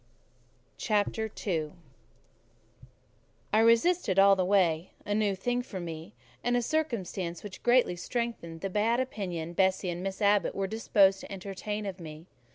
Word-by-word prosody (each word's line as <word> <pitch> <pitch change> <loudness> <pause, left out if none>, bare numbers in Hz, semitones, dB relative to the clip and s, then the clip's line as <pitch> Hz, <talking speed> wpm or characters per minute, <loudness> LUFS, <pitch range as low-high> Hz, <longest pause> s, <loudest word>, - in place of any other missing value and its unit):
CHAPTER 220 0 0 0.2
II 160 -6 -1 1.8
I 215 - +5
resisted 230 - +3
all 195 0 +7
the 185 - +1
way: 180 -3 +2
a 205 - -1
new 205 -2 +1
thing 245 +6 -1
for 200 -6 -7
me, 165 +2 -7 0.3
and 245 0 +2
a 245 - 0
circumstance 200 - -2
which 200 -2 -9
greatly 245 -6 +3
strengthened 175 -5 -4
the 195 - -2
bad 225 +4 +2
opinion 180 -10 -4
Bessie 190 0 +1
and 175 +1 -5
Miss 195 0 -4
Abbot 205 -1 +2
were 195 - -1
disposed 195 -2 +3
to - - -10
entertain 200 +2 -5
of 195 -2 -5
me. 155 -1 -9
195 Hz, 150 wpm, -29 LUFS, 180-225 Hz, 1.8 s, all